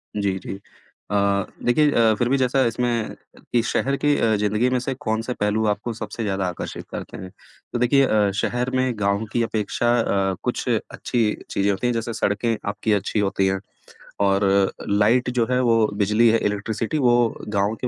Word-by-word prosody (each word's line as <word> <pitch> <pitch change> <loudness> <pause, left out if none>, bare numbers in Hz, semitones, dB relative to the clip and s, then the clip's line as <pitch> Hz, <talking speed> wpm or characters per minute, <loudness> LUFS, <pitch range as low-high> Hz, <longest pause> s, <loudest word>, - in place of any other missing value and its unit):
जी, 100 -2 0
जी। 95 +1 -7 0.5
अ, 105 - 0 0.5
देखिए 145 +4 +3
अ, 115 -2 +4
फिर 120 0 +1
भी 135 - +3
जैसा 130 +1 +2
इसमें 115 -1 -1 0.4
कि 120 - +4
शहर 140 +2 0
की 145 0 +2
अ, 110 -1 +2
ज़िंदगी 105 +4 +1
में 125 -1 +1
से 130 +2 -3
कौन-सा 115 -2 -2
पहलू 105 +1 +1
आपको 105 +3 -1
सबसे 110 +1 -6
ज़्यादा 95 -2 -1
आकर्षित 90 - -6
करते - - -7
हैं? 95 0 -8 0.4
तो 120 - -1
देखिए 135 +3 +4
अ, 105 -4 +2
शहर 120 +4 -1
में 130 -1 +1
गाँव 100 +2 0
की 120 - +2
अपेक्षा 110 +2 -1
अ, 95 -3 0
कुछ - - -2
अच्छी 120 -2 -1 0.3
चीज़ें 100 +1 +1
होती 100 +6 -1
हैं, 120 - +1
जैसे 115 0 -3
सड़कें 110 +2 0
आपकी 105 +1 -1
अच्छी 100 +1 0
होती 100 -1 +1
हैं 95 0 0 0.6
और 100 0 +3 0.4
लाइट 110 +5 +3
जो 120 -2 +1
है 125 - +2
वो 115 -3 +3
बिजली 105 +3 +3
है, 115 - +4
इलेक्ट्रिसिटी 110 +6 -2
वो 120 -4 +3
गाँव 105 +1 0
के 125 - -1
110 Hz, 185 wpm, -22 LUFS, 100-120 Hz, 0.6 s, अ